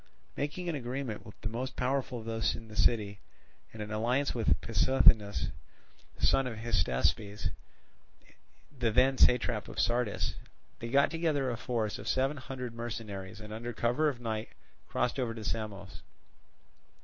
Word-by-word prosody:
Making 155 +5 -3
an 170 - 0
agreement 125 -4 -3
with 100 - -13
the - - -2
most 130 +3 -4
powerful 130 0 0
of 110 - -7
those 115 0 0
in 115 -1 -10
the 105 - -10
city, 105 -1 +2 0.5
and 110 -1 -6
an 105 - -7
alliance 120 +6 +1
with 115 -3 +2
Pissuthnes, 110 -2 +4 0.7
son 135 -1 +3
of 115 -3 -5
Hystaspes, 100 - 0 1.3
the 120 -3 +1
then 130 +4 +4
satrap 120 -3 +4
of - - -6
Sardis, 120 -3 +1 0.5
they 115 - -5
got 140 +3 +4
together 155 -6 +1
a - - -1
force 115 -3 -2
of - - -8
seven 135 +3 +1
hundred 130 -2 -6
mercenaries, 110 -4 -5
and 105 0 -8
under 120 +2 -4
cover 120 +7 +2
of 130 -4 -5
night 110 -2 -3 0.4
crossed 125 +2 0
over 115 -3 -1
to 110 - -6
Samos. 100 -4 -4
115 Hz, 150 wpm, -31 LUFS, 110-130 Hz, 1.3 s, Pissuthnes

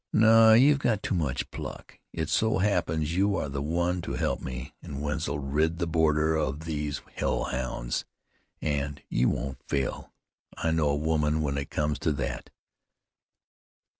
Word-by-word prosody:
"No; 110 0 +7
you've 140 +4 +6
got 115 -7 0
too - - -1
much 75 -7 -1
pluck. - - -8
It 80 -2 -3
so 110 -2 +2
happens 85 -5 0
you 100 +2 +2
are 70 - -2
the 70 0 -3
one 85 +4 0
to - - -5
help - - -1
me 65 -1 -6
an' 70 -1 -7
Wetzel 75 0 -2
rid 75 +4 0
the 85 - 0
border 80 -1 +2
of 75 -1 -1
these 75 -2 -3
hell - - 0
hounds, - - -2 0.6
an' 70 -2 -1
you 60 - +2
won't 65 +2 -3
fail. 70 -3 -2 0.5
I 80 - 0
know 80 -2 +2
a 70 - +2
woman 75 0 +1
when 70 -2 -1
it 70 0 -3
comes 75 -1 -1
to 80 - +1
that." 70 -3 -4
75 Hz, 165 wpm, -28 LUFS, 70-85 Hz, 0.6 s, No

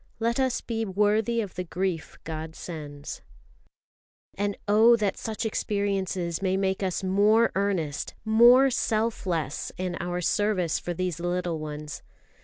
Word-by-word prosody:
"Let 235 +2 0
us 260 -2 +1
be 225 -1 -2
worthy 210 +3 +1
of 200 -4 -6
the 180 - -3
grief 180 -1 -3
God 160 0 -6
sends." 145 -4 -7 1.1
And 205 0 -2
oh 220 +3 +6
that 210 -3 0
such 225 +1 -4
experiences 195 -5 -1
may 190 -1 +1
make 190 0 0
us 190 0 -1
more 210 +4 +4
earnest, 185 -7 -1
more 240 +5 +7
self 220 -3 0
less 160 -5 -2
in 180 -1 -2
our 175 0 -2
service 185 -2 +1
for 175 - -4
these 180 -2 -2
little 175 -1 -1
ones! 150 -1 -6
190 Hz, 140 wpm, -27 LUFS, 175-215 Hz, 1.1 s, more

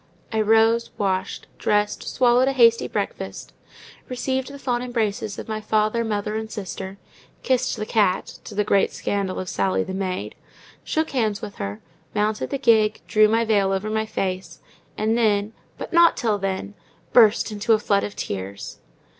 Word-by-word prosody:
I 220 -1 +1
rose, 225 +2 +3
washed, 190 -2 -2
dressed, 210 0 +1
swallowed 250 0 +3
a 270 - +2
hasty 230 -3 +5
breakfast, - - -5 0.6
received 260 +1 -2
the 280 - -8
fond 245 -3 -1
embraces 220 -4 -2
of - - -7
my 215 -1 -3
father, 215 +2 +1
mother, 210 -1 -2
and 220 0 -4
sister, 195 -2 -6 0.5
kissed 255 -2 +1
the 215 - -3
cat—to 205 0 -1
the 210 - +2
great 200 -1 +2
scandal 195 -2 -2
of 185 - -5
Sally, 190 +1 0
the 190 - -6
maid—shook 195 +10 -4
hands 220 -6 -1
with 200 - -7
her, 100 +2 -5 0.3
mounted 210 +1 0
the 280 - -2
gig, 220 -5 +3
drew 215 0 +4
my 225 +2 +2
veil 200 -3 +2
over 195 +3 -2
my 220 0 -1
face, 185 -4 -3 0.4
and 220 +1 +1
then, 215 -2 +1 0.2
but - - -7
not 340 0 +6
till 215 -3 0
then, 195 +1 -3 0.4
burst 225 -1 +5
into 215 +2 +1
a - - +5
flood 200 -2 +1
of 205 - -5
tears. 100 +1 -6
215 Hz, 165 wpm, -23 LUFS, 200-230 Hz, 0.6 s, not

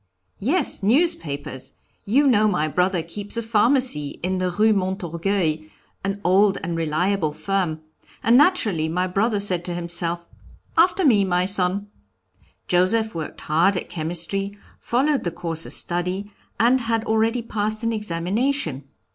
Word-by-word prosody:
"Yes, 290 - 0
newspapers! 195 - 0 0.3
You 265 +8 +3
know 215 -5 +4
my 155 -7 0
brother 180 +2 0
keeps 205 +6 -3
a 230 - -1
pharmacy 225 - +2
in 185 +1 -1
the 185 0 0
Rue 215 +4 +3
Montorgueil, 185 -3 -1 0.4
an 195 +1 -2
old 195 +2 +4
and 170 +1 -3
reliable 165 +1 0
firm, 180 -4 -2 0.4
and 230 +2 +4
naturally 225 - +3
my 180 +3 0
brother 205 +4 0
said 185 -4 +3
to 175 - -4
himself, 170 0 -2 0.5
'After 355 +2 +3
me, 215 -8 +5
my 180 -1 +1
son.' 195 0 +1 0.8
Joseph 220 +5 +2
worked 160 -2 -6
hard 170 +6 +2
at - - -5
chemistry, 175 +5 -1 0.2
followed 275 +4 0
the 175 - -1
course 165 -1 -3
of - - -7
study, 180 +4 -1 0.3
and 250 +3 +4
had 230 -1 -1
already 225 +2 +1
passed 215 0 -2
an 230 0 0
examination. 195 - -2
195 Hz, 140 wpm, -22 LUFS, 170-225 Hz, 0.8 s, me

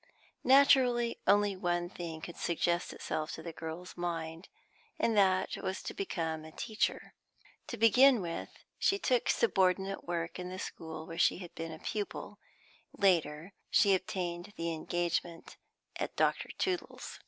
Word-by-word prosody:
Naturally, 255 -3 +5
only 205 -1 +4
one 175 -1 -1
thing 170 -3 -7
could 170 - -7
suggest 175 +1 0
itself 155 0 -3
to 160 - -7
the 170 -1 -6
girl's 165 +3 -7
mind, 165 0 -4 0.5
and 225 - +1
that 190 -2 +3
was 190 - -4
to - - -5
become 165 -5 -3
a 160 - -10
teacher. 220 +5 -2 0.5
To - - -5
begin 245 +4 +6
with, 170 -3 -4 0.3
she 395 - +3
took 255 -10 +1
subordinate 195 -2 +2
work 170 0 -3
in 180 0 -5
the 185 - -6
school 160 -3 -6
where 165 - -7
she - - +4
had 175 -2 -9
been 165 0 -5
a 160 - -7
pupil; 205 +5 -5 0.6
later, 170 -2 +2 0.2
she 200 - +5
obtained 180 -1 -2
the 165 0 -1
engagement 170 +1 -2 0.4
at - - -3
Dr. - - +1
Tootle's. 365 -2 -3
175 Hz, 145 wpm, -32 LUFS, 165-205 Hz, 0.6 s, begin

